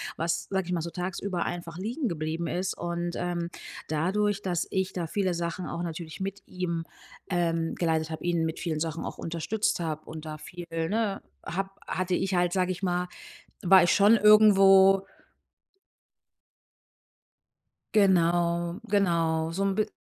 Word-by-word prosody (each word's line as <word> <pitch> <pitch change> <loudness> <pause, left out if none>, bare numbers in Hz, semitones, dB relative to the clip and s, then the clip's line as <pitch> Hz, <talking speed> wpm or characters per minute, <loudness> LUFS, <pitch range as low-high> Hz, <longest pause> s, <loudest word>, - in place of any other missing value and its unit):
was 165 +1 -1
sage 190 -2 -1
ich - - -4
mal 175 - 0
so 170 +1 -5
tagsüber 180 0 -3
einfach 170 -1 -5
liegen 240 +8 -2
geblieben 160 0 -3
ist. 180 +3 -1
Und, 175 0 -3
ähm, 175 -1 -2 0.4
dadurch, 195 +6 0
dass 175 -2 -1
ich 190 0 -1
da 170 -3 -3
viele 190 0 0
Sachen 170 +1 -3
auch 170 +1 -4
natürlich 165 +1 -6
mit 195 +1 -4
ihm, 170 -3 -3 0.4
ähm, 165 -2 0
geleitet 160 -2 0
habe, 160 - -6
ihn 170 -2 +1
mit 160 - -4
vielen 160 -3 -2
Sachen 165 0 -3
auch - - -6
unterstützt 170 +4 -1
habe 155 -2 -3
und 160 0 -8
da 155 0 -6
viel, 175 +3 -9
ne, 195 +6 -1 0.2
habe 195 +3 -2 0.2
hatte 185 -1 -1
ich 190 0 -1
halt, 175 -1 +2
sage 185 -1 +1
ich 180 - -5
mal 180 -1 0 0.6
war 185 0 +7
ich 175 - +3
schon 205 +3 +6
irgendwo 195 -2 +6 2.9
Genau, 175 -2 +3
genau, 165 -5 +2
so 195 - 0
'n 195 - +2
bi 215 - +1
175 Hz, 155 wpm, -28 LUFS, 165-190 Hz, 2.9 s, war